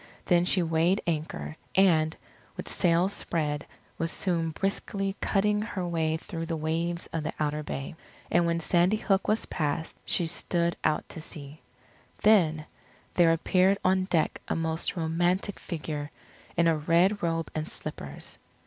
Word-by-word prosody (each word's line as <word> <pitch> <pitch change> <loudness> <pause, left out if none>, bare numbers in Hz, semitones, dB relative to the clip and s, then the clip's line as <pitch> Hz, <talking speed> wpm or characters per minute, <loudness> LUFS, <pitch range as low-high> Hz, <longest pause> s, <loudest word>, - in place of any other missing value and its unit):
Then 175 0 +4
she 180 0 +4
weighed 165 +4 +2
anchor, 150 - -3 0.2
and, 165 -4 +4 0.4
with - - -5
sails 175 +2 +2
spread, 150 -5 -2 0.3
was 165 0 -1
soon 170 -3 0
briskly 195 +3 -2
cutting 210 +1 +2
her 190 -5 -3
way 160 -2 0
through 165 -1 -6
the 165 - -2
waves 165 +2 -1
of 165 - -1
the 155 - -3
outer 150 0 0
bay. 135 -2 -5 0.4
And 175 0 +4
when 170 0 +1
Sandy 175 +5 +3
Hook 195 -2 +1
was 215 +1 +1
passed, 155 0 -2
she 175 - +1
stood 170 +1 0
out 155 -1 +1
to 160 - -7
sea. 150 -1 -10 0.6
Then, 165 -8 +4 0.5
there 170 -2 +5
appeared 185 +4 +3
on 185 0 +3
deck 170 -4 0
a - - 0
most 160 +2 0
romantic 175 +4 0
figure, 150 -3 -4 0.5
in 170 - +4
a 165 -1 +4
red 175 +7 +3
robe 165 -1 -1
and 155 0 -3
slippers. 70 - -6
165 Hz, 150 wpm, -28 LUFS, 160-185 Hz, 0.6 s, there